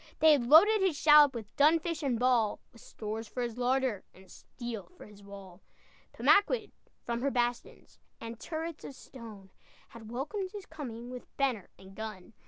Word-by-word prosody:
They 315 0 +6
had 265 -6 +2
loaded 405 - +6
his 370 -6 +1
shallop 295 -3 +6
With 220 -3 -8
dun 305 +3 +5
fish 330 -1 -4
and 265 -5 0
ball, 240 -3 +1
With 230 - -17
stores 220 +1 -7
for 245 +4 -4
his 240 0 -5
larder, 250 -4 0
And 190 0 -18
steel 235 -5 -8
for - - -12
his 210 -1 -16
wall. 195 -2 -12 0.5
Pemaquid, 420 +2 +2 0.3
from 235 0 -3
her 280 - +1
bastions 240 -2 -3 0.2
And 230 0 -8
turrets 325 0 -6
of 275 - -9
stone, 215 -9 -12 0.4
Had 225 -2 -12
welcomed 370 - -4
his 405 -2 -8
coming 245 -6 -8
With 250 -1 -11
banner 255 -8 -1
and 190 +1 -15
gun. 215 -1 -8
245 Hz, 175 wpm, -30 LUFS, 220-300 Hz, 0.5 s, They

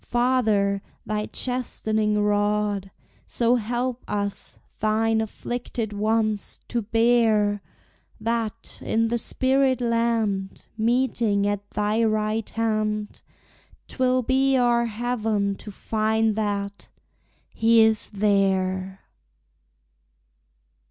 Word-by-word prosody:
Father, 220 -5 +1 0.2
thy 210 0 -2
chastening 220 -4 -1
rod 205 -1 +1 0.4
So 240 +1 +2
help 245 +2 -2
us, 200 -1 -3 0.2
thine 220 +1 +2
afflicted 225 0 -4
ones, 215 0 -1
to 235 - 0
bear, 220 -2 +2 0.6
That, 230 0 -3
in 225 0 +1
the 235 0 0
spirit 265 +1 +1
land, 230 -5 0
Meeting 225 -3 +1
at 205 0 -2
thy 210 +2 0
right 215 0 0
hand, 215 -2 -2 0.7
'Twill 255 -1 +1
be 265 +2 +2
our 240 -1 +3
heaven 220 -3 -1
to - - -10
find 220 +1 0
that 200 -2 -3 0.6
he 230 0 +4
is 220 -1 +3
there! 190 -2 0
220 Hz, 90 wpm, -24 LUFS, 205-235 Hz, 0.7 s, he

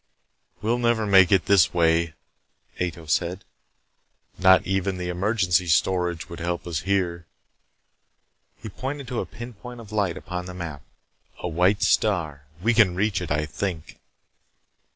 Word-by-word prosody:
"We'll 115 +3 +1
never 115 -2 +1
make 95 -2 +6
it 95 -3 +4
this 100 -3 +4
way," 85 -1 +2 0.7
Ato 85 -2 -3
said. 85 +4 -1 0.9
"Not 95 0 +5
even 95 0 -1
the 90 -1 -4
emergency 90 -1 +1
storage 90 0 +1
would 85 - -9
help 85 0 -3
us. 85 -4 -2
Here," 90 -3 -1 1.3
he - - -9
pointed 135 +6 -5
to 125 - -2
a - - -3
pinpoint 120 +1 -10
of 110 -3 -12
light 100 -5 0
upon 90 0 -6
the 90 - -8
map. 80 -6 -6 0.6
"A - - -4
white 90 +4 +2
star. 80 -9 +1 0.2
We 115 +2 +3
can 105 -6 +4
reach 100 -1 0
it, 85 - -5
I 75 +1 0
think." 80 +1 -5
90 Hz, 145 wpm, -24 LUFS, 85-100 Hz, 1.3 s, make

